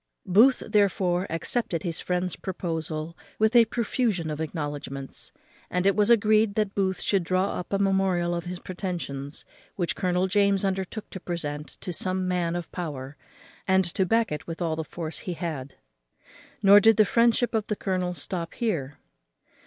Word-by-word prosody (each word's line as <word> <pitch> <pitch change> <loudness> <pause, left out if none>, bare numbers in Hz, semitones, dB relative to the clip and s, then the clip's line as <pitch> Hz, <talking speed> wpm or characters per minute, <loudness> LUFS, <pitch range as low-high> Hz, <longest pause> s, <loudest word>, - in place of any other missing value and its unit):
Booth, 230 +9 +5
therefore, 190 -3 +2
accepted 165 +1 -1
his 170 -2 -3
friend's 180 0 -1
proposal 165 -3 -4 0.2
with 220 +2 +2
a 235 -1 +8
profusion 220 -7 -1
of 150 +1 -4
acknowledgments; 145 -3 -5 0.4
and 180 +1 -1
it 195 - +4
was 210 +1 +3
agreed 215 -2 +4
that 210 -2 0
Booth 190 -2 0
should 195 -3 +1
draw 185 +3 +1
up 180 - -7
a 200 - +2
memorial 190 -3 +1
of 170 0 -3
his 180 +1 -4
pretensions, 175 -7 -5 0.3
which 175 -3 -1
Colonel 180 -1 +1
James 200 0 +2
undertook 190 +2 -3
to 190 - -6
present 150 -4 -4
to 180 - -4
some 185 +2 -1
man 175 -2 0
of 175 -1 -5
power, 145 -5 -5 0.5
and 190 0 +4
to 190 - +2
back 225 +2 +2
it 150 - -5
with 165 -1 -5
all 165 -3 0
the 160 - -3
force 160 +1 -6
he 180 - -4
had. 155 -6 -5 0.9
Nor 200 +1 +9
did 225 0 +5
the 215 - +6
friendship 235 +2 +3
of 220 -2 0
the 210 - -1
colonel 185 -3 -2
stop 170 -2 -4
here. 160 - -2
185 Hz, 170 wpm, -26 LUFS, 165-200 Hz, 0.9 s, Nor